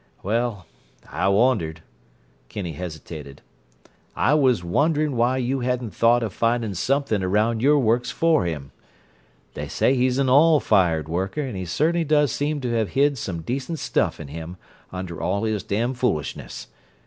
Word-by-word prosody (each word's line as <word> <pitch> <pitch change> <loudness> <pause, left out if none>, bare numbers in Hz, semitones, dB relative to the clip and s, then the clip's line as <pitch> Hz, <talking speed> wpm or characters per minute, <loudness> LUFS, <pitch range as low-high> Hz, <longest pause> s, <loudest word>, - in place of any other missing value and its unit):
"Well—I 105 -4 -3
wondered—" 100 -7 +1 0.7
Kinney 95 -5 -5
hesitated. 75 -3 -8 0.7
"I 145 - +2
was 130 - +3
wondering 145 - +1
why 120 +2 +2
you 130 +1 -1
hadn't 125 -4 -2
thought 115 +4 +3
of 105 -4 -4
finding 115 -2 0
something 130 +2 0
around 105 +5 +1
your 145 +3 +4
works 120 -1 +1
for 160 - +2
him. 75 -5 -4 0.8
They - - -5
say 130 - +2
he's 130 0 +1
an 135 -1 +1
all 150 +4 +5
fired 85 - +2
worker 95 - -2
and 130 -7 -4
he 95 -1 -4
certainly 165 - +1
does 150 -3 +2
seem 145 +2 -2
to 125 -2 -2
have 110 -3 0
hid 140 -1 +3
some 85 -6 -4
decent 135 - -3
stuff - - -1
in - - -8
him 80 +4 -7 0.3
under 90 -3 -6
all 95 +5 -1
his 110 -2 -1
damfoolishness. 120 - -2
115 Hz, 150 wpm, -23 LUFS, 90-135 Hz, 0.8 s, all